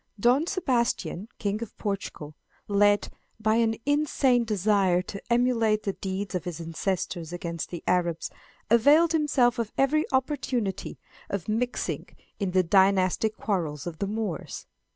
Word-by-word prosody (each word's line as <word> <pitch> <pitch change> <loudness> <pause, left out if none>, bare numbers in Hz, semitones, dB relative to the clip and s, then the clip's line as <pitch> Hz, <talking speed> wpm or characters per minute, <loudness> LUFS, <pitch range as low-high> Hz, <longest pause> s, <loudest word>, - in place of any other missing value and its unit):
Don 250 +9 +3
Sebastian, 245 - -1
King 205 0 -2
of 230 - -7
Portugal, 195 -7 -4 0.3
led 205 0 +3 0.3
by 215 +1 +2
an 225 -1 +2
insane 280 -4 +2
desire 200 -4 +2
to 200 +1 -7
emulate 230 -3 +2
the 195 - -1
deeds 190 +1 -4
of 180 - -2
his 175 -2 -5
ancestors 170 0 -3
against 170 -2 -4
the 175 -2 -7
Arabs, 170 -2 0 0.4
availed 290 +8 +6
himself 265 -6 +2
of 225 -2 -2
every 300 +3 +2
opportunity 260 -6 -1 0.3
of 200 -4 -3
mixing 240 +3 -2 0.3
in 200 -3 0
the 185 0 +3
dynastic 190 +3 +3
quarrels 160 -9 -2
of 170 -2 -6
the 200 - -1
Moors. 210 -4 -4
210 Hz, 135 wpm, -27 LUFS, 185-245 Hz, 0.4 s, availed